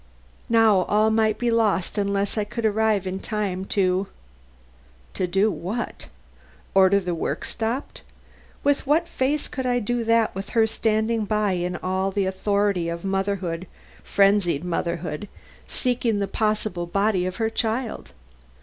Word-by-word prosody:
Now 225 -3 +5
all 215 +1 +3
might 220 -1 +2
be 240 -1 0
lost 215 -5 +1
unless 200 -1 0
I 215 - +1
could 225 +2 -4
arrive 215 -2 +2
in 190 +1 -3
time 195 -4 -2
to 190 -1 +1 1.1
do 195 +3 +1
what? 185 +8 -4 0.7
Order 195 +1 +5
the 180 -2 -3
work 165 - -2
stopped? 235 +5 -3 0.6
With 285 -1 +1
what 320 +4 +3
face 285 0 -1
could 260 -1 -4
I 245 0 +2
do 240 +1 -1
that 230 -1 +3
with 195 +1 -6
her 225 - +6
standing 220 0 0
by 210 -1 +1
in 180 0 -1
all 190 +1 0
the 195 0 0
authority 195 -2 0
of 170 +2 -5
motherhood 190 -3 -2 0.4
frenzied 195 -6 +3
motherhood 170 0 -3 0.4
seeking 245 -4 0
the 200 -1 -1
possible 210 -4 -1
body 195 0 +1
of 185 - -4
her 225 +1 -1
child! 225 - -2
205 Hz, 140 wpm, -24 LUFS, 185-225 Hz, 1.1 s, her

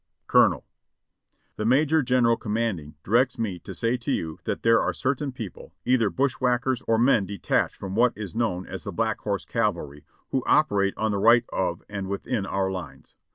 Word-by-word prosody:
"Colonel: - - +3 0.9
"The 105 - -2
Major 150 +6 +3
General 125 -3 +3
commanding 105 -10 -3
directs 120 +5 +2
me 100 -6 -3
to - - -9
say 115 +2 0
to 120 - -4
you 80 -1 -3
that - - -3
there 115 0 +5
are - - 0
certain 135 +2 -2
people, 115 -8 -9
either 120 -4 +3
bushwhackers 130 -1 0
or 115 - +3
men 115 -5 +3
detached 100 +1 -1
from 95 -1 -7
what 120 +2 +2
is 105 -4 -6
known 110 -6 -1
as - - -7
the - - -5
Black - - -1
Horse - - -2
Cavalry, 75 0 -2 0.3
who 130 - 0
operate 100 -10 +3
on 110 0 0
the 100 - -1
right 120 +3 +5
of 85 -2 -2
and 100 -2 -5
within 100 +1 -3
our 95 0 -1
lines. 90 -2 -8
115 Hz, 180 wpm, -25 LUFS, 100-125 Hz, 0.9 s, there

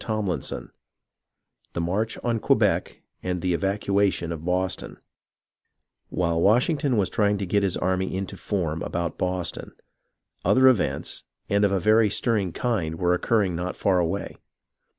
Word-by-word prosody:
CHAPTER 110 -4 -1
IX - - -3 1.2
THE - - -3
MARCH 100 +7 -1
ON 120 -2 0
QUEBEC - - +1 0.2
AND 90 -1 -3
THE 90 -1 +1
EVACUATION 100 -1 0
OF 80 -1 -5
BOSTON 90 +1 -2 1.1
While 85 -2 0
Washington 125 - +3
was 100 -3 +2
trying 105 -2 +1
to 100 - -3
get 100 +3 +1
his 95 -3 0
army 95 0 -1
into 95 0 -4
form 85 -6 -2
about 85 -1 -3
Boston, 90 -2 -2 0.7
other 130 0 +5
events, 125 -7 +1 0.3
and 100 +1 +2
of 100 - +3
a 100 - +1
very 110 +3 +4
stirring 100 -3 0
kind, 90 -8 -1
were 90 +1 +2
occurring 95 -1 +1
not 90 +2 -3
far 95 -2 +2
away. 90 +3 -2
95 Hz, 145 wpm, -25 LUFS, 90-105 Hz, 1.2 s, other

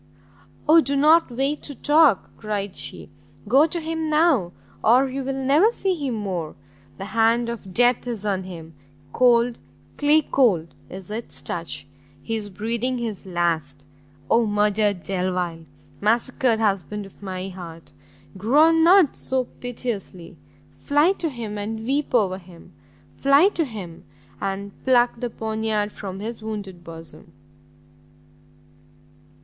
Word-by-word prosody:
"O 325 +2 +7
do 280 0 -2
not 310 +3 +5
wait 270 +5 -1
to 285 - -7
talk!" 295 -7 +3
cried 205 -3 -4
she, - - -5 0.4
"go 275 +8 +5
to 340 +2 -3
him 320 -1 -3
now, 300 - +3 0.3
or 250 +5 +5
you 265 +1 -4
will 270 +1 -3
never 300 +11 +5
see 390 -5 -1
him 280 -8 -3
more! 185 -7 -4 0.4
the 195 - -6
hand 230 +3 +2
of 220 -5 -7
death 245 +4 +2
is 225 -4 -3
on 195 -2 0
him, 165 -3 -9 0.4
cold, 240 -1 +3 0.4
clay 300 +1 +4
cold 190 - +2 0.2
is 190 +1 -9
its 225 +2 -4
touch! 170 -4 -4 0.4
he 225 - -2
is 210 -2 -3
breathing 230 +6 -2
his 220 -5 -5
last 160 -6 -2 0.4
Oh 230 +6 +3
murdered 205 -2 +1
Delvile! 180 -3 -2 0.4
massacred 235 +2 +1
husband 205 -1 -1
of 195 - -17
my 190 -1 -5
heart! 170 -3 -10 0.4
groan 305 - +4
not 355 -3 +6
so 260 -1 -1 0.2
piteously! 230 -8 -5 0.4
fly 295 +5 +2
to 345 -4 -2
him, 225 -6 -6
and 220 +2 -4
weep 275 +1 0
over 190 -5 +2
him! 175 -2 -16 0.4
fly 280 +7 +5
to 335 -6 -1
him 195 - -9 0.4
and 195 +1 -3
pluck 245 -2 +3
the 245 - -2
poniard 220 -1 -2
from 195 -2 -7
his 225 +1 -6
wounded 200 -5 -6
bosom!" 165 -1 -10
220 Hz, 135 wpm, -23 LUFS, 190-270 Hz, 0.4 s, O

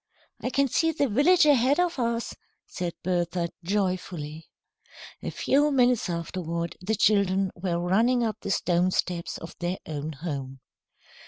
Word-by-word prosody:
"I - - -1
can 280 +1 +2
see 325 +6 +2
the 285 -3 +1
village 290 - +4
ahead 280 +1 +4
of 350 -5 +1
us," 235 -1 -1 0.3
said 175 -2 -4
Bertha, 175 -1 0
joyfully. 180 -5 -2 0.7
A - - -3
few 290 +2 +2
minutes 250 -6 +3
afterward, 170 0 -3
the 215 +4 0
children 195 -2 +2
were 175 -1 -2
running 225 +8 +2
up 220 -2 -1
the - - -5
stone 180 -1 +2
steps 180 -2 -2
of 165 - -9
their 175 +1 -2
own 155 0 -4
home. 135 -3 -5
185 Hz, 145 wpm, -26 LUFS, 170-245 Hz, 0.7 s, village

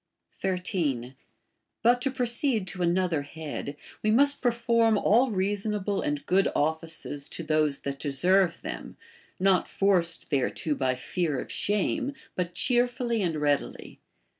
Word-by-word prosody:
13. 165 -9 -2 0.7
But 245 +2 +4
to 270 - +1
proceed 245 -3 0
to 185 - -6
another 175 -2 +1
head, 145 -1 -6 0.2
we 215 - +1
must 285 +6 +3
perform 230 -2 +3
all 240 +6 +4
reasonable 205 0 -1
and 145 -1 -2
good 190 +2 +3
offices 160 -2 -1
to 170 - -6
those 155 -2 +1
that 140 0 -4
deserve 175 +5 +2
them, - - -6 0.4
not 190 -1 +3
forced 175 -5 +1
thereto 145 +2 0
by 130 -2 0
fear 150 +2 -2
of - - -6
shame, 255 +8 -1 0.2
but 180 -1 -3
cheerfully 240 +1 +1
and 170 -4 0
readily. 145 -1 -1
185 Hz, 130 wpm, -27 LUFS, 155-225 Hz, 0.7 s, But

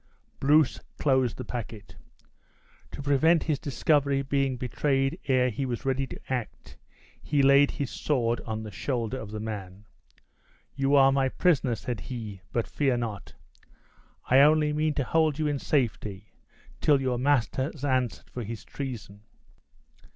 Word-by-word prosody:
Bruce 150 +1 +3 0.2
closed 130 -4 +1
the - - -6
packet. 115 -3 -7 0.9
To 140 - -8
prevent 150 +4 +3
his 150 -4 -1
discovery 140 0 +1
being 135 -1 0
betrayed 135 +2 0
ere 130 -2 +3
he 125 +6 -3
was 125 -2 -4
ready 135 0 0
to - - -9
act, 125 -4 -5 0.5
he 145 -2 +1
laid 140 +1 +6
his 140 -4 -4
sword 120 -5 0
upon 110 -1 -5
the 110 - -7
shoulder 125 +1 -3
of 110 - -7
the 105 0 -5
man: 105 -2 -7 0.9
"You 135 +1 +1
are 135 -1 +6
my 135 -1 +2
prisoner," 140 -7 +2
said 120 0 -5
he; 110 -6 -7
"but 115 - 0
fear 135 -4 0
not. 110 -5 -5 0.9
I 130 - +5
only 150 +1 +5
mean 155 0 0
to 140 - 0
hold 155 +1 +1
you 155 - -1
in 145 -2 0
safety 105 -8 -2 0.5
till 145 -3 +4
your 130 -2 -1
master 130 -1 +1
has 145 -2 -7
answered 130 -4 -1
for 125 - -5
his 110 0 -7
treason." 115 -7 -7
130 Hz, 150 wpm, -27 LUFS, 115-140 Hz, 0.9 s, laid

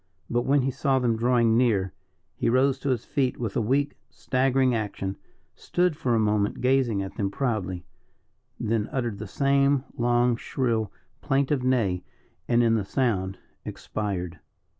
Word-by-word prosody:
But 120 0 0
when 140 0 +3
he 135 - 0
saw 135 0 +1
them 120 -3 +1
drawing 115 -1 +3
near, 105 -7 +2 0.4
he - - 0
rose 130 +2 +3
to 140 - -2
his 125 -3 -1
feet 135 -4 0
with 115 -5 -4
a - - +2
weak, 140 +6 0
staggering 130 0 +1
action, 100 -3 -3 0.4
stood 180 -2 0
for 130 -6 0
a - - +2
moment 105 -1 +1
gazing 125 -6 +2
at 95 - -8
them 100 -2 0
proudly, 95 -7 -2 0.7
then 110 -1 -1
uttered 120 -7 -2
the 105 - -6
same 140 +3 +2
long, 120 0 +2
shrill, 115 -6 -1 0.3
plaintive 140 -1 +1
neigh, 115 -9 +1 0.4
and 120 0 +3
in 115 -1 +3
the 110 -2 +1
sound 95 -5 -1 0.3
expired. 95 -5 -4
120 Hz, 155 wpm, -26 LUFS, 105-130 Hz, 0.7 s, when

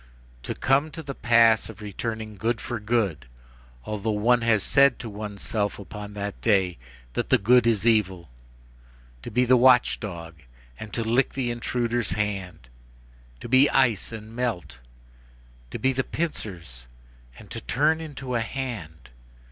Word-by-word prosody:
To - - -5
come 140 +3 +2
to 160 - -6
the 140 -1 -5
pass 115 -3 +4
of 110 -1 -11
returning 110 +1 -5
good 115 +3 -1
for 120 -2 -4
good, 105 - -1 0.6
although 105 +1 -3
one 115 +3 +3
has 115 -3 +2
said 140 -2 +4
to 120 - -7
oneself 105 0 -3
up 100 - -11
to 105 -1 -7
that 100 0 -5
day 95 - +2 0.3
that - - -2
that - - +3
good 125 +2 +5
is 110 -3 +1
evil! 95 -7 +2 0.9
to - - -7
be 125 +3 +2
the 130 +1 +5
watch 125 0 +5
dog, 85 -6 -7 0.4
and 110 - -8
to 115 - -1
lick 120 +4 +1
the 125 -3 -1
intruder's 120 -1 -1
hand! 95 - -3 0.7
to - - -6
be 130 +4 +5
ice 120 -8 +2
and 110 0 -9
melt! 120 - -3 0.9
to - - -5
be 130 0 +1
the 130 +1 0
pincers 85 - -5 0.5
and - - -14
to - - -5
turn 155 +5 +1
into 140 -5 -6
a 120 - +1
hand! 110 - -6
115 Hz, 155 wpm, -25 LUFS, 100-125 Hz, 0.9 s, good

